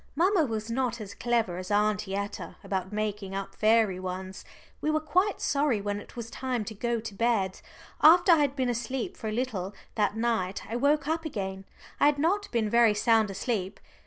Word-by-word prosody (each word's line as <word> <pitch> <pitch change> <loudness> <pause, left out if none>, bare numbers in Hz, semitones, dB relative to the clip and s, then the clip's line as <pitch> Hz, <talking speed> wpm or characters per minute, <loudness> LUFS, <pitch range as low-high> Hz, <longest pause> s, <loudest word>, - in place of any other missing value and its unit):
Mamma 350 +1 +3
was 220 -2 -4
not 240 -1 -1
as 205 -2 -7
clever 225 -5 0
as 185 - -7
Aunty 205 -2 +1
Etta 200 0 -5
about 190 -1 -3
making 210 -2 -3
up 195 0 -4
fairy 215 -4 +3
ones. 185 +1 -6 0.4
We 305 - 0
were 310 0 +2
quite 360 +7 +1
sorry 280 -6 +1
when 205 0 -2
it - - -13
was 230 -1 -6
time 250 -4 -2
to 220 - -6
go 235 +2 -1
to 220 -1 -7
bed. 200 -3 0 0.4
After 345 +3 +7
I 335 - +7
had 285 -2 +1
been 260 -2 0
asleep 240 +1 -2
for 220 - -6
a - - -1
little 215 -5 -3 0.2
that 210 0 0
night 225 -5 -1
I 225 - -4
woke 285 +3 +2
up 325 +1 0
again 195 -10 -4 0.3
I - - +6
had 295 -1 +3
not 385 +8 +1
been 230 -3 +1
very 230 -1 +4
sound 220 -1 +3
asleep. 195 -1 -3
225 Hz, 195 wpm, -28 LUFS, 200-265 Hz, 0.4 s, After